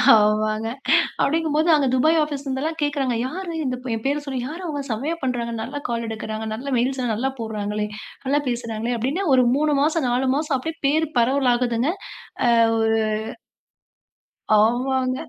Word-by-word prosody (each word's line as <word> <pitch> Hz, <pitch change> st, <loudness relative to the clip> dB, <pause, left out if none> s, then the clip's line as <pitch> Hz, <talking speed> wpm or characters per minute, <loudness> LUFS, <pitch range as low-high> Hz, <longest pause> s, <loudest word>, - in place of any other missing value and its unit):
ஆமாங்க. 215 Hz, +1 st, +2 dB, 0.5 s
அப்பிடிங்கம்போது 315 Hz, +1 st, +1 dB
அங்க 285 Hz, -3 st, +2 dB
துபாய் 315 Hz, +5 st, +4 dB
ஆபீஸ்ல 285 Hz, -2 st, -5 dB
இருந்து 265 Hz, +1 st, -2 dB
எல்லாம் 320 Hz, +1 st, -3 dB
கேக்குறாங்க. 275 Hz, -4 st, 0 dB
யாரு 355 Hz, +4 st, -5 dB
இந்த 255 Hz, -1 st, -1 dB, 0.2 s
எம் 225 Hz, -, -6 dB
பேரச் 290 Hz, +1 st, 0 dB
சொல்லி 265 Hz, -2 st, -2 dB
யாரு? 325 Hz, +5 st, -7 dB
அவுங்க 290 Hz, -3 st, -3 dB
செமயா 275 Hz, +10 st, -2 dB
பண்றாங்க, 240 Hz, -2 st, -1 dB
நல்லா 285 Hz, -, -4 dB
கால் 235 Hz, -1 st, -2 dB
எடுக்குறாங்க, 220 Hz, 0 st, -5 dB
நல்லா 275 Hz, +5 st, -5 dB
மெயில்ஸ்லாம் 250 Hz, -1 st, 0 dB
நல்லா 265 Hz, +5 st, -1 dB
போடுறாங்களே! 210 Hz, -1 st, -3 dB, 0.4 s
நல்லா 285 Hz, +2 st, +2 dB
பேசுறாங்களே! 235 Hz, 0 st, -2 dB
அப்பிடின்னா 280 Hz, -, -1 dB
ஒரு 255 Hz, -1 st, +4 dB
3 300 Hz, 0 st, +2 dB
மாசம், 310 Hz, -2 st, +1 dB
4 250 Hz, +2 st, +1 dB
மாசம் 300 Hz, -2 st, 0 dB
அப்பிடியே 320 Hz, +5 st, -5 dB
பேரு 315 Hz, +3 st, +2 dB
பரவலாகுதுங்க. 245 Hz, +1 st, +2 dB, 0.6 s
அ -, -, +5 dB, 0.3 s
ஒரு 225 Hz, 0 st, +2 dB, 1.6 s
ஆமாங்க. 255 Hz, +3 st, +1 dB
260 Hz, 150 wpm, -22 LUFS, 230-295 Hz, 1.6 s, அ